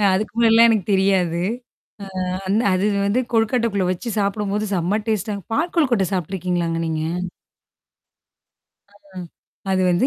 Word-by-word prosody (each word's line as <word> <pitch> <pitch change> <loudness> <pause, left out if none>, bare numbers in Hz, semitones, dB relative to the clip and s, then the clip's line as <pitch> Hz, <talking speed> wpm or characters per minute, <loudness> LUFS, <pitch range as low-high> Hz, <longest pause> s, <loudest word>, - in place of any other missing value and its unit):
அ - - 0
அதுக்கு 210 +2 -2
முன்னாடி 230 -1 +4
எல்லாம் 230 +1 +7
எனக்கு 215 -5 +1
தெரியாது. 190 -3 +2 0.9
அ - - -2 0.2
அந்த 205 +4 +2
அது 185 +2 +1 0.2
வந்து 205 +5 +1
கொழுக்காட்டைக்குள்ள 225 -4 +1
வச்சு 205 +7 -4
சாப்பிடும்போது 205 +1 -1
செம்ம 185 +4 0
டேஸ்ட்டா. 215 -1 -1 0.2
பால் 325 +7 0
கொல்கட்ட 245 - +3
சாப்பட்டுருக்கீங்களாங்க 175 -2 -2
நீங்க? 160 -1 -2 1.9
அ 200 -2 -15 0.5
அது 185 -1 +2
வந்து 180 +9 +2
200 Hz, 130 wpm, -21 LUFS, 185-225 Hz, 1.9 s, எல்லாம்